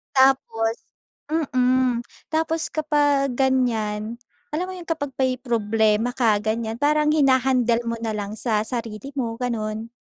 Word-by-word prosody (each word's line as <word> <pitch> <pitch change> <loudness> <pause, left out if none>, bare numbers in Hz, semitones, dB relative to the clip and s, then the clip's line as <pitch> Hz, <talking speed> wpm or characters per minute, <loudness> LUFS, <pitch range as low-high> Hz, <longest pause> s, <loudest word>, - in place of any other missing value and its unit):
Tapos 230 -4 +3 0.8
mm. 255 -1 +2 0.3
Tapos 320 +1 0
kapag 290 -3 +2
ganyan, 235 -4 0 0.3
alam 325 +5 -2
mo 375 - -6
yun? 355 -2 -9
Kapag 285 -5 -3
may 255 -1 +1
problema 225 -2 +1
ka 230 -4 +2
ganyan, 220 +1 -1
parang 300 +2 +3
hina-handle 260 -4 +3
mo 230 - -1
nalang 210 -2 -3
sa 220 -1 0
sarili 230 +2 -5
mo, 230 -4 -3
ganon. 225 -2 -3
245 Hz, 125 wpm, -23 LUFS, 225-275 Hz, 0.8 s, Tapos